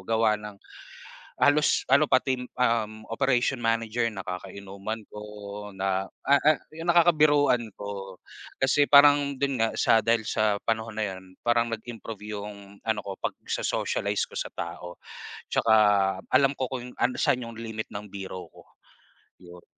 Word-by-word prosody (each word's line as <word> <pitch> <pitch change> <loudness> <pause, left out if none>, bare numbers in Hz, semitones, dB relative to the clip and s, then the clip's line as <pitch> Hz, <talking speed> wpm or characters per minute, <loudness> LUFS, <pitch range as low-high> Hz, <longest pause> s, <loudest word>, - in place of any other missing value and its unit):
Gawa 110 -1 +2
ng 105 -1 -9 0.8
halos 145 0 +3
ano 140 +3 +4
pati, 130 0 +2 0.2
um, 110 -3 0
operation 130 0 +1
manager 115 +1 0
nakakainuman 100 +2 -6
ko 105 - -10 0.5
na, 95 -1 -2 0.2
ah 140 0 +5
ah, 155 0 +4 0.2
'yong 165 +2 -1
nakakabiruan 150 -8 +4
ko. 100 -2 -7 0.4
Kasi 140 +2 +2
parang 145 -1 +6
don 140 0 0
nga 115 - +2
sa 115 - +4
dahil 115 -1 +1
sa 105 -1 +1
panahon 110 -1 -2
na 110 - 0
'yon 95 0 -14
parang 120 0 +2
nag-improve 115 -2 -7
'yong 100 -1 -9
ano 110 -1 0
ko 100 0 -6
pagso-socialize - - -2
ko - - -13
sa - - -4
tao. 90 0 -6 0.5
Tsaka, 110 - +2 0.6
alam 135 +1 +5
ko 130 - -1
kung 125 -1 -5
an 125 - +2
saan 125 - +2
'yong 115 -1 -9
limit 110 -1 -5
ng 100 +1 -6
biro 95 -2 -7
ko, - - -16 0.8
yon. 90 0 -13
115 Hz, 145 wpm, -26 LUFS, 100-130 Hz, 0.8 s, parang